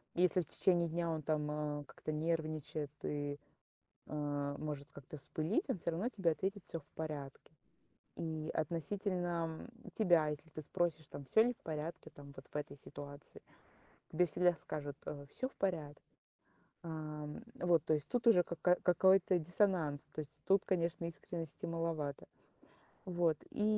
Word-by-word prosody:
если 180 Hz, +1 st, +4 dB
в -, -, -6 dB
течение 175 Hz, -3 st, +3 dB
дня 170 Hz, +1 st, 0 dB
он 160 Hz, -2 st, -1 dB
там, 150 Hz, -1 st, +1 dB
э, 150 Hz, -1 st, -1 dB
как-то 155 Hz, -, -5 dB
нервничает 155 Hz, -2 st, -1 dB
и, 145 Hz, -1 st, -1 dB, 0.7 s
э, 145 Hz, -1 st, -1 dB
может 145 Hz, -2 st, -3 dB
как-то 140 Hz, +2 st, -9 dB
вспылить, 160 Hz, -, 0 dB
он 230 Hz, -, +1 dB
всё 170 Hz, -, 0 dB
равно 195 Hz, +10 st, 0 dB
тебе 190 Hz, -8 st, +2 dB
ответит: 190 Hz, +5 st, -1 dB
"Всё 165 Hz, -, -3 dB
в 145 Hz, -, -20 dB
порядке". 150 Hz, -3 st, -5 dB, 0.7 s
И 160 Hz, -1 st, -2 dB
относительно, 170 Hz, 0 st, 0 dB
м, 240 Hz, +1 st, -13 dB
тебя, 175 Hz, -8 st, +5 dB
если 150 Hz, +2 st, -4 dB
ты 155 Hz, -, -5 dB
спросишь, 160 Hz, 0 st, 0 dB
там, 140 Hz, -, -7 dB
всё 220 Hz, +11 st, +6 dB
ли 245 Hz, +1 st, +2 dB
в -, -, -30 dB
порядке, 155 Hz, +1 st, -4 dB
там, 140 Hz, -1 st, -11 dB
вот 135 Hz, -, -9 dB
в -, -, -4 dB
этой 145 Hz, -1 st, -3 dB
ситуации, 145 Hz, +1 st, -9 dB, 0.7 s
тебе 180 Hz, +3 st, +5 dB
всегда 175 Hz, +2 st, +4 dB
скажут, 145 Hz, -2 st, -4 dB
э: 140 Hz, -1 st, -5 dB
"Всё 260 Hz, -, -1 dB
в -, -, -25 dB
порядке". 160 Hz, -7 st, -1 dB, 0.8 s
Ам, 155 Hz, +1 st, -5 dB
вот, 170 Hz, -3 st, +4 dB
то -, -, +2 dB
есть 150 Hz, -, -2 dB
тут 245 Hz, -1 st, 0 dB
уже 180 Hz, -6 st, +8 dB
ка 170 Hz, -, -5 dB
ка 180 Hz, 0 st, +6 dB
какой-то 185 Hz, +1 st, +6 dB
диссонанс, 170 Hz, -4 st, +2 dB
то 155 Hz, -, -2 dB
есть 145 Hz, +1 st, -13 dB
тут, 195 Hz, 0 st, +5 dB
конечно, 170 Hz, -2 st, +1 dB
искренности 165 Hz, -1 st, -5 dB
маловато. 165 Hz, -4 st, -1 dB, 0.8 s
Вот, 170 Hz, -4 st, +2 dB
и 210 Hz, -, 0 dB
160 Hz, 160 wpm, -37 LUFS, 150-175 Hz, 0.8 s, уже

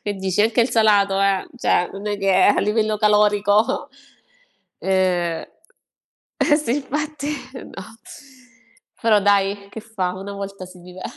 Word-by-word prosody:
che 205 Hz, -1 st, -3 dB
dici? 190 Hz, +1 st, -1 dB
Anche 225 Hz, +2 st, +2 dB
il 235 Hz, -, +1 dB
salato, 200 Hz, -3 st, +3 dB
eh, 195 Hz, -1 st, +1 dB
cioè, 175 Hz, -, +1 dB
non 200 Hz, +2 st, -8 dB
è 205 Hz, -, -1 dB
che 195 Hz, -1 st, +1 dB
a 190 Hz, +2 st, +4 dB
livello 215 Hz, 0 st, 0 dB
calorico, 210 Hz, 0 st, +2 dB, 0.9 s
ehm 180 Hz, -3 st, 0 dB, 1.0 s
eh 295 Hz, -2 st, +4 dB
sì, 290 Hz, -4 st, -1 dB
infatti 295 Hz, +1 st, -4 dB, 0.3 s
no. 195 Hz, -6 st, -9 dB, 1.2 s
Però 220 Hz, -3 st, +3 dB
dai 200 Hz, 0 st, +1 dB
che 220 Hz, -, -8 dB
fa? 205 Hz, -5 st, -3 dB
Una 195 Hz, +2 st, -7 dB
volta 195 Hz, -1 st, -7 dB
si 180 Hz, 0 st, -15 dB
vive. 180 Hz, +1 st, -12 dB
200 Hz, 140 wpm, -21 LUFS, 190-220 Hz, 1.2 s, a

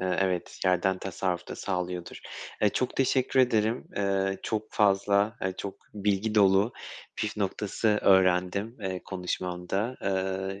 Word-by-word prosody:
eee, 95 Hz, 0 st, 0 dB
evet 95 Hz, -2 st, -1 dB
yerden 95 Hz, 0 st, +2 dB
tasarruf 90 Hz, -1 st, -3 dB
da -, -, -6 dB
sağlıyordur. 90 Hz, -2 st, -4 dB, 0.4 s
Eee, 105 Hz, -, +6 dB
çok 125 Hz, +4 st, -2 dB
teşekkür 130 Hz, 0 st, +2 dB
ederim. 115 Hz, -2 st, +1 dB
Eee, 95 Hz, -1 st, 0 dB
çok 110 Hz, 0 st, -3 dB
fazla 100 Hz, +1 st, +3 dB
ay, 95 Hz, 0 st, -1 dB
çok 100 Hz, 0 st, -5 dB, 0.2 s
bilgi 105 Hz, +1 st, 0 dB
dolu 100 Hz, +2 st, +4 dB, 0.4 s
püf 110 Hz, -1 st, -2 dB
noktası 105 Hz, +2 st, -1 dB
öğrendim, 95 Hz, +4 st, +3 dB
eee, 95 Hz, -2 st, -3 dB
konuşmanda. 90 Hz, +4 st, -3 dB
Iıı, 95 Hz, 0 st, -2 dB
95 Hz, 130 wpm, -28 LUFS, 95-105 Hz, 0.4 s, Eee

